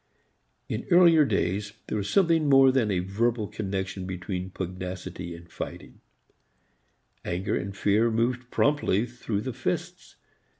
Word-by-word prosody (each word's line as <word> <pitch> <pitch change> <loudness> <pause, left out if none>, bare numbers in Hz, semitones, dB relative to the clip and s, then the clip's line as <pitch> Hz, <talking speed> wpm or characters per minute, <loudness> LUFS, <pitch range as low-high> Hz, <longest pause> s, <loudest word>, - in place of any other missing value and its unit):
In - - -4
earlier 170 -4 +6
days 100 -4 -1
there - - -4
was 100 0 -3
something 165 -6 +3
more 135 -1 +7
than 130 -5 +1
a 95 - +1
verbal 105 +4 0
connection 95 -2 -4
between 95 0 -4
pugnacity 90 -1 -6
and 85 +1 -13
fighting; - - -8 1.2
anger 90 +2 -2
and 100 0 -4
fear 105 +4 +3
moved 120 +2 -1
promptly 140 -8 +2
through 115 -4 -4
the 130 +2 -4
fists. - - -4
105 Hz, 130 wpm, -27 LUFS, 95-125 Hz, 1.2 s, more